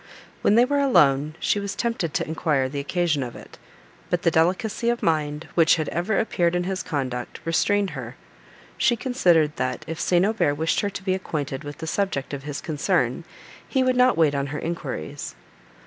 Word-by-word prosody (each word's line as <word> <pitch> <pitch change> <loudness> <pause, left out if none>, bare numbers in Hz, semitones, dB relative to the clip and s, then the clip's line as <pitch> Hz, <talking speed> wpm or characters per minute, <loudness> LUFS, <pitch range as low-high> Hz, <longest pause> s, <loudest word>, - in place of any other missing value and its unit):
When 205 - +4
they 240 +2 +6
were 285 +2 +1
alone 150 - +3
she 205 - +1
was 200 0 -4
tempted 230 -9 -1
to - - 0
enquire 155 -4 0
the 140 +2 -4
occasion 160 0 0
of 120 -2 -5
it, - - -13 0.5
but 175 0 0
the 170 - +3
delicacy 190 +8 +1
of 240 0 -1
mind, 150 -1 0
which 165 -2 +5
had 155 -3 -2
ever 180 +5 -1
appeared 175 -6 +1
in 175 - +1
his 190 +1 -2
conduct, 130 -7 -4
restrained 200 +4 +1
her: - - -7 0.6
she 240 - +3
considered 175 - +2
that, 125 0 -2
if 165 0 -5
St. 180 +1 +3
Aubert 190 -9 +1
wished 160 +2 0
her 205 - 0
to 195 - -7
be 190 -1 +1
acquainted 150 -7 -3
with 145 0 -7
the 160 - -6
subject 160 -6 -2
of 140 - -4
his 145 -1 -5
concern, 160 -2 0 0.4
he 265 -2 +1
would 255 0 +2
not 250 -3 +4
wait 155 -3 +4
on 140 0 -1
her 145 +1 -4
enquiries. 160 - -5
165 Hz, 195 wpm, -24 LUFS, 145-200 Hz, 0.6 s, they